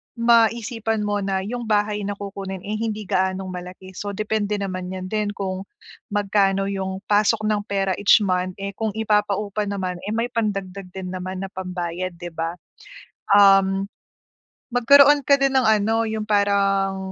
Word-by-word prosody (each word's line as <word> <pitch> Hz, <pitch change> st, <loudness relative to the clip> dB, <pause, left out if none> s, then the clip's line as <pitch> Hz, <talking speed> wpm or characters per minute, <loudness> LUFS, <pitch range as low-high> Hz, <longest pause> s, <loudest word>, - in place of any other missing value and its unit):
maisipan 230 Hz, -1 st, +2 dB
mo 205 Hz, 0 st, -1 dB
na 195 Hz, -1 st, -1 dB
yung 235 Hz, +2 st, -5 dB
bahay 210 Hz, 0 st, +1 dB
na 205 Hz, -, -3 dB
kukunin 195 Hz, -2 st, -7 dB
ay 215 Hz, +1 st, -4 dB
hindi 215 Hz, -2 st, -3 dB
gaanong 190 Hz, 0 st, -1 dB
malaki. 180 Hz, +1 st, -9 dB
So, 200 Hz, +1 st, -6 dB
depende 215 Hz, 0 st, -1 dB
naman 185 Hz, -2 st, -4 dB
'yan 185 Hz, 0 st, -6 dB
din, 215 Hz, -1 st, 0 dB
kung 190 Hz, 0 st, -4 dB, 0.4 s
magkano 200 Hz, -1 st, +1 dB
yung 190 Hz, 0 st, -4 dB
pasok 210 Hz, +1 st, +3 dB
ng 215 Hz, -1 st, +1 dB
pera 195 Hz, -1 st, 0 dB
each 205 Hz, +1 st, +5 dB
month. 185 Hz, -1 st, -1 dB
Eh, 200 Hz, 0 st, -5 dB
kung 215 Hz, +1 st, -3 dB
ipapaupa 210 Hz, -1 st, 0 dB
naman, 185 Hz, -3 st, -3 dB
eh, 215 Hz, -, -2 dB
may 240 Hz, +2 st, -1 dB
pandagdag 195 Hz, -4 st, -3 dB
din 185 Hz, -1 st, -5 dB
naman 185 Hz, +1 st, -5 dB
na 190 Hz, -, -6 dB
pambayad, 180 Hz, -1 st, -4 dB
'di 175 Hz, 0 st, -8 dB
ba? 165 Hz, +1 st, -3 dB, 0.8 s
Um, 195 Hz, -1 st, +5 dB, 0.9 s
magkaroon 280 Hz, +4 st, +6 dB
ka 280 Hz, +1 st, +4 dB
din 275 Hz, 0 st, +1 dB
ng 255 Hz, -4 st, +3 dB
ano, 220 Hz, +1 st, +2 dB
yung 220 Hz, -1 st, -3 dB
parang 200 Hz, -2 st, +2 dB
200 Hz, 160 wpm, -22 LUFS, 190-215 Hz, 0.9 s, magkaroon